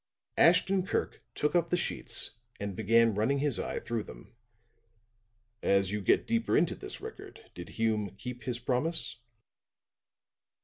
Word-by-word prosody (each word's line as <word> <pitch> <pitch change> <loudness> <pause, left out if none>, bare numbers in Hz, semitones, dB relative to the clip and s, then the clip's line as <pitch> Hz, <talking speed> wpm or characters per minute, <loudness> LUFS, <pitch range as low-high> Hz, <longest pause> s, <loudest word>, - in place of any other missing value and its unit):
Ashton 185 +2 +5
Kirk 190 - -2
took 150 - 0
up 170 -1 +2
the 175 - +2
sheets - - -1 0.3
and 100 -2 -4
began 115 +2 +4
running 110 +7 +1
his 140 -3 +1
eye - - -3
through 115 -1 -3
them. - - -12 1.3
"As 100 -1 +2
you 105 0 -2
get 95 - +3
deeper 230 0 +1
into 170 - +2
this - - -7
record, - - -10
did 85 - -9
Hume 105 -4 -1
keep 125 +3 -7
his 120 0 -3
promise?" 125 +7 -1
120 Hz, 140 wpm, -30 LUFS, 105-160 Hz, 1.3 s, Ashton